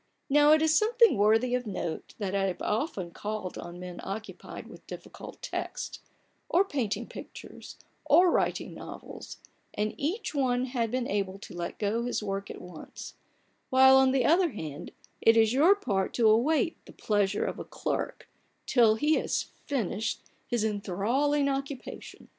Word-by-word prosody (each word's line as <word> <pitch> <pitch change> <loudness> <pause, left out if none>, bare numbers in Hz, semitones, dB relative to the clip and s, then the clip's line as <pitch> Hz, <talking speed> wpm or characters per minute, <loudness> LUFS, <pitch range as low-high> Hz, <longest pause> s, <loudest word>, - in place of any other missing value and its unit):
Now 295 +1 +6
it 310 0 +4
is 315 0 +3
something 460 - +5
worthy 220 +4 +3
of 250 -2 -1
note, 175 -5 -5
that 195 -3 -3
I 195 -1 +1
have 185 -2 -2
often 210 - -2
called 210 -1 -5
on 175 +1 -8
men 180 -1 -8
occupied 210 +3 -7
with - - -14
difficult - - -10
texts; - - -4 0.5
or 375 +3 +4
painting 250 - -2
pictures; - - -10 0.3
or 360 0 +6
writing - - 0
novels; - - -9 0.4
and 210 +1 -1
each 345 +8 -2
one 255 -3 +1
had 240 -3 -1
been 250 +1 -1
able 195 -1 -1
to - - -11
let 175 0 -5
go 215 +2 0
his 245 -3 -2
work 195 -1 -3
at - - -7
once: 180 -3 -10 0.6
while, 265 0 +7
on 265 0 +5
the 260 -2 +2
other 335 0 +4
hand, 155 -3 -6 0.3
it 225 0 +5
is 220 0 +4
your 320 +9 +6
part 200 - -1
to 230 -2 +4
await 285 +9 +2
the - - -12
pleasure 205 -2 0
of - - -4
a - - -4
clerk, - - -4 0.4
till 230 -4 +4
he 300 +7 +2
has - - -2 0.2
finished 225 -5 -2 0.2
his 240 -4 0
enthralling 220 +8 0
occupa 275 -1 -3
tion. - - -13
230 Hz, 165 wpm, -29 LUFS, 200-280 Hz, 0.6 s, while